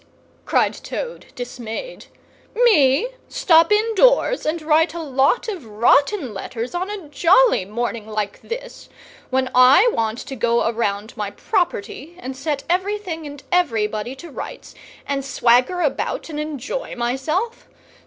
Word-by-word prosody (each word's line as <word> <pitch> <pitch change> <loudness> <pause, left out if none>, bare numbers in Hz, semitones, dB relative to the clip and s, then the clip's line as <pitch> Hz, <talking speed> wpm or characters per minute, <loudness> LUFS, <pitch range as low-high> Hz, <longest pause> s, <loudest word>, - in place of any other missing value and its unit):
cried - - +2
Toad, - - -6
dismayed. 245 - -7 0.5
"Me 420 - +4 0.2
stop 330 +1 +4
indoors 455 +1 +3
and 320 +2 0
write 315 +1 +2
a - - -4
lot 275 - +1
of 385 - -5
rotten 245 - +2
letters 230 - -5
on 365 +2 -2
a 405 -6 -6
jolly 350 - +4
morning 225 +1 -4
like 215 -2 -4
this, - - -8 0.4
when 260 0 0
I 270 - +6
want 225 0 -1
to 270 +1 -7
go 235 0 +1
around 220 -2 -2
my 210 -3 -3
property, 340 - -2
and 260 -5 -6
set 280 +1 -3
everything 365 -3 -2
and 285 -1 -10
everybody 225 -9 0
to 335 +4 -11
rights, - - -8 0.3
and 275 -1 -2
swagger 255 +6 +2
about 305 +1 -2
and 300 -2 -5
enjoy 300 - -4
myself! 270 - -2
285 Hz, 135 wpm, -21 LUFS, 240-365 Hz, 0.5 s, I